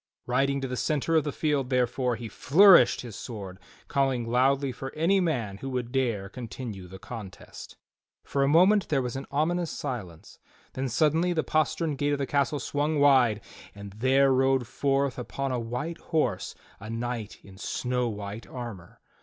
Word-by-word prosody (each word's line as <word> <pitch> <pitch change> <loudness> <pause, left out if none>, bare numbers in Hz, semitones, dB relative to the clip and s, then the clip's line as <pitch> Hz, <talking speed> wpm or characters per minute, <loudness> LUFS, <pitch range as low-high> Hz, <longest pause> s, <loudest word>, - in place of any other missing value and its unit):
Riding 135 +3 +1
to 135 - -2
the 125 - -4
centre 155 +3 0
of 155 -2 +3
the 145 - -1
field, 145 -5 -1
therefore, 125 -1 +1
he 115 0 -7
fiourished 170 - +6
his 120 -5 -9
sword 100 -6 -8 0.3
calling 135 -4 0
loudly 135 +3 +2
for 135 +2 -7
any 170 +6 +3
man 120 - -1
who 135 - -5
would 125 -2 -3
dare 120 -7 0
continue 110 -3 -7
the 95 +2 -10
contest. 95 -1 -10 0.5
For 140 - -2
a 135 - +3
moment 185 +7 +4
there 140 -4 +1
was 125 0 -4
an 135 - -6
ominous 165 +4 0
silence, 100 - -6 0.3
then 130 0 -2
suddenly 160 +7 +2
the 160 -2 0
postern 155 0 0
gate 145 +1 0
of - - 0
the 140 - -1
castle 140 +1 0
swung 145 +4 -1
wide 130 -7 +4 0.3
and 100 -1 -9
there 130 +4 +3
rode 130 -1 +2
forth 135 +2 0
upon 130 +4 -3
a 125 - -1
white 125 +9 -4
horse 130 - -1 0.2
a 110 +2 -9
knight 115 -1 -4
in 95 -1 -15
snow 125 +2 -1
white 105 +1 -7
armor. 115 -9 -8
130 Hz, 170 wpm, -27 LUFS, 115-145 Hz, 0.5 s, fiourished